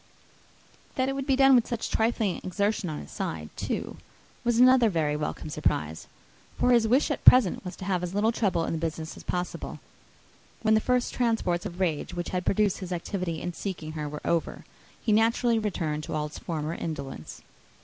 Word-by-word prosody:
That 260 0 +1
it - - -1
would 275 0 -4
be 270 - +4
done 270 0 +6
with 245 -3 +5
such 235 -3 -3
trifling 220 -4 +1
exertion 200 0 -1
on 155 - -4
his 70 - -12
side, 75 -1 -4
too, - - -3 0.5
was 240 -1 +2
another 250 -2 +6
very 155 -5 0
welcome 150 0 -4
surprise; 80 - -1 0.5
for 250 - +3
his 235 -2 +5
chief - - -1
wish 265 +5 +3
at 290 - -3
present 250 -8 +6
was 180 0 -6
to 185 - -8
have 185 -2 0
as 180 +1 -4
little 215 +2 +3
trouble 185 -8 0
in - - -2
the 160 - -2
business 160 0 -4
as - - -11
possible. 180 0 -4 0.8
When 220 -1 +4
the 220 - +4
first 250 +1 +1
transports 225 -7 0
of 175 -1 -10
rage 175 -1 -1
which 175 0 -3
had 180 0 -3
produced 205 -1 +2
his 185 -2 -7
activity 175 -1 -3
in 175 - -3
seeking 170 -5 -5
her 150 -2 -4
were 150 0 -8
over, 170 -1 -1 0.3
he 225 - -1
naturally 230 +2 +3
returned 165 -8 -2
to - - -4
all 150 0 -1
his 150 - -9
former 160 -2 -3
indolence. 140 - -6
185 Hz, 200 wpm, -27 LUFS, 160-225 Hz, 0.8 s, done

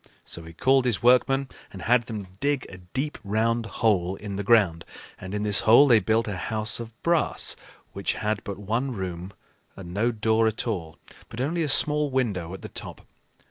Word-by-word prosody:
So 85 - -4
he 80 - -11
called 130 +8 +3
his 120 -4 0
workmen 135 +2 +4 0.2
and 95 - -9
had 120 0 +2
them 100 -4 -7
dig 140 -2 0
a 90 - -10
deep 130 +12 -4
round 115 +3 0
hole 95 -6 0
in 100 0 -7
the 100 - -3
ground, 100 -7 +3 0.4
and 95 +2 -6
in 105 - -2
this 105 -1 +3
hole 120 +6 +6
they 120 -5 +5
built 110 +3 +1
a 100 -3 -3
house 110 +5 0
of 115 0 -9
brass 170 -2 +3 0.4
which 100 - -2
had 105 -1 -2
but 100 - -6
one 115 +6 -2
room 90 -2 -5 0.4
and 90 -3 -9
no 110 +5 +1
door 110 0 +1
at 110 0 -2
all, 85 -8 -4 0.3
but 115 - -9
only 160 +6 -1
a 155 - -1
small 150 +1 +3
window 105 -11 -1
at - - -13
the - - -7
top. - - -7
110 Hz, 195 wpm, -25 LUFS, 95-125 Hz, 0.4 s, hole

